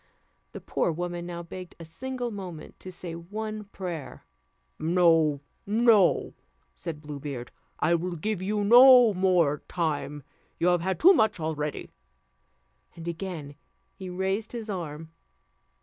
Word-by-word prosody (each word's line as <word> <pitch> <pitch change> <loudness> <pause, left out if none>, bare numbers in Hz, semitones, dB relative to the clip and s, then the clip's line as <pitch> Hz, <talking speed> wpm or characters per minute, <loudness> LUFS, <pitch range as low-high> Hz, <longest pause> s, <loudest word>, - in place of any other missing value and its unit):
The - - -8
poor - - 0
woman 175 +1 -4
now 170 -1 -6
begged 180 +1 -9
a 165 - -8
single 245 +8 -5
moment 180 -6 -8
to 185 - -9
say 175 -1 -7
one 210 +5 -6
prayer. 175 - -7 0.5
"No, 165 -3 +3 0.3
no," 215 -3 +4 0.4
said 160 -4 -7
Blue 145 -1 -7
Beard, 135 -4 -6 0.3
"I 170 - +2
will 175 +1 -1
give 200 +3 -2
you 205 +2 -1
no 245 +1 +8
more 180 -6 +2
time. 150 -4 -2 0.3
You 175 - +2
have 175 -1 +2
had 190 +2 -2
too 370 +4 +8
much 220 - +2
already." 150 -2 -3 1.0
And 165 0 -9
again 170 -4 -5 0.4
he 190 -1 -8
raised 190 +5 -2
his 225 -3 -4
arm. 160 -3 -6
175 Hz, 135 wpm, -27 LUFS, 160-205 Hz, 1.0 s, no